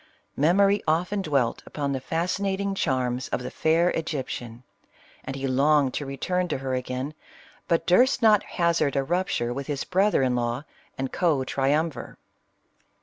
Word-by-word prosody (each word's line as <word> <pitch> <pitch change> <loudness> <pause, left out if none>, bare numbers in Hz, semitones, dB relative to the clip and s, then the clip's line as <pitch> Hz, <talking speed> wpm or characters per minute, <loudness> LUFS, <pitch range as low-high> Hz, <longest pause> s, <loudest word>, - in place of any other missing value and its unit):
Memory 195 +7 +3
often 180 +6 +1
'dwelt 140 -9 0
upon 145 -2 -3
the 135 - -1
fascinating 190 +6 -1
charms 130 -7 -1
of 125 - -3
the 125 - -5
fair 165 +2 +2
Egyptian, 130 -6 -4 0.6
and 135 - -5
he 135 0 -4
longed 140 +1 +3
to 145 - -3
return 180 +6 -1
to 155 - -2
her 130 0 -3
again, 130 +3 -3 0.5
but 165 -1 +1
durst 250 +10 +4
not 215 -4 +5
hazard 170 -5 0
a 135 - +2
rupture 165 -7 -1
with 140 +1 -5
his 145 -2 -2
brother 190 -4 +2
in 125 -1 +1
law 120 +2 -1 0.3
and 135 0 -3
co 155 -7 +2
triumvir. 145 +4 -1
150 Hz, 150 wpm, -25 LUFS, 130-180 Hz, 0.6 s, not